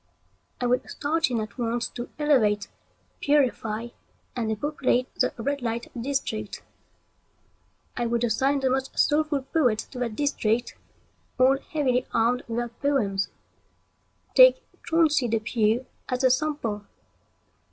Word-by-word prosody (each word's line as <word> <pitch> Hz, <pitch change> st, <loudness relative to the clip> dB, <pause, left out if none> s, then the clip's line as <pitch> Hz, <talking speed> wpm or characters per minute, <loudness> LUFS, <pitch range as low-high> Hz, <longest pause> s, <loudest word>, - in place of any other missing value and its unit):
I 250 Hz, -, -1 dB
would 245 Hz, +1 st, +1 dB
start 315 Hz, +2 st, 0 dB
in 240 Hz, -2 st, 0 dB
at 215 Hz, +2 st, -8 dB
once 235 Hz, 0 st, -1 dB
to 240 Hz, 0 st, -7 dB
elevate, 225 Hz, -9 st, +2 dB, 0.5 s
purify, 240 Hz, -6 st, +1 dB, 0.5 s
and 230 Hz, -3 st, -1 dB
depopulate 255 Hz, +1 st, 0 dB
the -, -, +1 dB
red 280 Hz, +4 st, -2 dB
light 235 Hz, 0 st, -3 dB
district. 235 Hz, -5 st, -3 dB, 1.3 s
I 240 Hz, -1 st, -1 dB
would 235 Hz, 0 st, 0 dB
assign 265 Hz, +5 st, +1 dB
the 260 Hz, -1 st, +2 dB
most 265 Hz, 0 st, -2 dB
soulful 300 Hz, -2 st, +2 dB
poets 260 Hz, -6 st, +1 dB
to 255 Hz, -, -10 dB
that 235 Hz, -3 st, -2 dB
district, 240 Hz, -4 st, 0 dB, 0.6 s
all 265 Hz, +2 st, +5 dB
heavily 260 Hz, -5 st, 0 dB
armed 235 Hz, +2 st, +2 dB
with 230 Hz, 0 st, -3 dB
their 240 Hz, 0 st, -1 dB
poems. 230 Hz, -7 st, 0 dB, 1.0 s
Take -, -, +7 dB, 0.2 s
Chauncey 310 Hz, -6 st, +3 dB
Depew 225 Hz, +1 st, +1 dB, 0.2 s
as 250 Hz, +1 st, -1 dB
a 260 Hz, -, +5 dB
sample. 250 Hz, -8 st, -1 dB
250 Hz, 125 wpm, -26 LUFS, 230-280 Hz, 1.3 s, Take